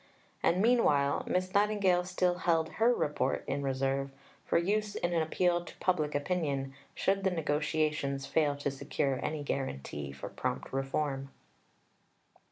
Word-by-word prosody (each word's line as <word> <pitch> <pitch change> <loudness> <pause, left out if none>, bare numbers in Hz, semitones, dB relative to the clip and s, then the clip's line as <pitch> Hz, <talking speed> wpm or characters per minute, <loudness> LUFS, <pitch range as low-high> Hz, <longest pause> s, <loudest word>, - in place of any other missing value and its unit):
And 185 +4 +3
meanwhile 150 -13 +3
Miss 185 +1 0
Nightingale 200 -3 +3
still 180 -1 0
held 165 -3 +2
her 230 +2 +5
Report 150 -11 0
in 140 +1 -2
reserve, 135 0 0 0.4
for - - +3
use 205 +4 0
in 175 0 -1
an 165 - +2
appeal 175 +2 +1
to - - -12
public 155 -6 0
opinion, 145 -4 -1 0.2
should 195 0 +1
the 190 - +3
negotiations 150 -4 0
fail 150 -3 +2
to 140 0 -2
secure 135 0 -1
any 150 -1 -2
guarantee 75 - -3
for 70 -1 -7
prompt - - -4
reform. 135 0 -1
155 Hz, 140 wpm, -31 LUFS, 140-180 Hz, 0.4 s, her